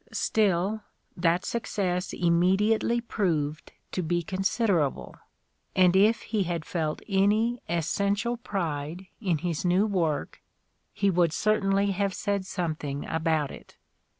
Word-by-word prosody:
Still, 205 0 +1 0.3
that 175 0 +1
success 185 -6 -2
immediately 195 +7 +2
proved 160 -10 -2 0.2
to 185 - -1
be 175 +1 0
considerable, 185 - 0 0.6
and 180 -1 +5
if 215 +4 +4
he 215 -2 -1
had 170 -3 -2
felt 160 -3 -2
any 215 +4 +2
essential 200 +7 0
pride 170 -5 -4 0.2
in 180 -7 +1
his 165 0 -3
new 180 +3 +3
work 170 -8 -1 0.5
he 200 -1 +1
would 175 -2 +3
certainly 200 -1 +2
have 195 0 -1
said 200 -2 -2
something 155 -6 -3
about 160 -3 0
it. - - -13
185 Hz, 120 wpm, -27 LUFS, 165-205 Hz, 0.6 s, and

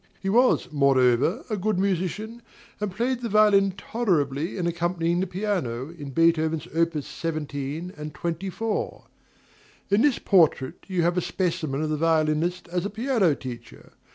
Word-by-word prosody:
He 195 - -3
was, 245 -1 +3
moreover, 135 0 +3
a 215 - -2
good 210 0 -1
musician, 195 +5 -2 0.4
and 210 -1 -2
played 240 +5 -1
the 235 - -3
violin 200 -2 +4
tolerably 170 - -1
in 180 - -1
accompanying 170 0 0
the 190 - 0
piano, 175 - -2
in 145 -4 -8
Beethoven's 160 +1 +2
opus 165 -3 0
17 150 +1 -4
and 150 0 -7
24. 190 +8 -3 0.9
In 200 +2 +4
this 290 -2 +3
portrait 160 -8 +2
you 185 -3 0
have 175 +1 +2
a - - -2
specimen 165 -6 -2
of 155 - -1
the 155 - 0
violinist 160 +2 +1
as 175 0 -1
a 200 - -2
piano 220 - +1
teacher. 125 -3 -10
170 Hz, 150 wpm, -25 LUFS, 155-200 Hz, 0.9 s, violin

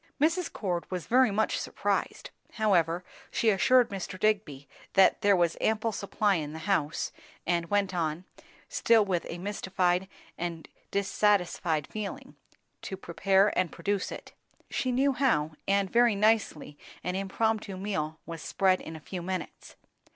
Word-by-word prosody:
Mrs. 330 +5 +1
Cord 175 -5 -3
was 180 -2 -4
very 255 0 +4
much 215 +2 0
surprised; - - -2 0.2
however, 180 -6 +2 0.3
she 225 - +2
assured 250 +5 +4
Mr. 190 -1 -5
Digby 190 -11 0 0.3
that 190 -1 +5
there 205 -2 +5
was 175 -2 +2
ample 220 +1 +1
supply 200 -1 0
in 150 -2 -4
the - - -6
house, 160 -6 0 0.3
and 170 -1 0
went 200 -2 +1
on, 165 0 -2 0.4
still 230 - +3
with 180 -3 -1
a 170 - -5
mystified 190 -1 0 0.3
and 170 -2 -4 0.2
dissatisfied 190 -6 +1
feeling, 215 -2 -6 0.5
to 190 - -6
prepare 195 +3 +2
and 185 -3 +1
produce 200 -2 -2
it. - - -8 0.4
She 255 - 0
knew 270 +3 +3
how, 230 - +1 0.2
and 195 0 +2
very 235 +1 +4
nicely 200 -8 +1 0.2
an 180 - -2
impromptu 200 +1 -1
meal 160 -6 -3
was 165 -1 -7
spread 185 +2 +2
in 160 - -8
a - - -8
few 180 +4 -6
minutes. 185 +1 -6
195 Hz, 145 wpm, -29 LUFS, 170-215 Hz, 0.5 s, that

